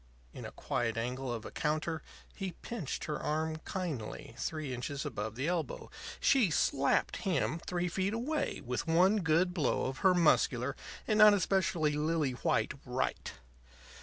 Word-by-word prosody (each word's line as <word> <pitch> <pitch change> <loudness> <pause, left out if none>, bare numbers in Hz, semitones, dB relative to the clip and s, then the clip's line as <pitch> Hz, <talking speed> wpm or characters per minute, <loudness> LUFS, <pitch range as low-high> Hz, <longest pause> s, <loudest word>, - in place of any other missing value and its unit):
In - - -8
a - - -6
quiet 115 -2 -2
angle 125 +2 -2
of 115 -2 -4
a - - -7
counter 155 +1 -1 0.3
he 190 -3 -4
pinched 225 - -4
her 150 -1 -3
arm 155 +1 -1
kindly, 165 - -4
three 155 -5 -3
inches 135 +3 -4
above 105 +1 -4
the 135 +5 -2
elbow. 175 -2 -2 0.3
She 250 -9 +4
slapped 140 -3 +2
him 175 -3 0
three 180 0 0
feet 190 +4 -1
away 295 +7 -2
with 125 +6 -2
one 180 +6 +4
good 180 0 +2
blow 155 -8 +1
of 130 +1 -3
her 190 -1 +5
muscular 140 -6 +3 0.3
and 215 0 +2
not 210 -1 +9
especially 180 -5 +1
lily 150 -1 +1
white 125 - 0
right. - - -2
160 Hz, 155 wpm, -32 LUFS, 135-185 Hz, 0.3 s, not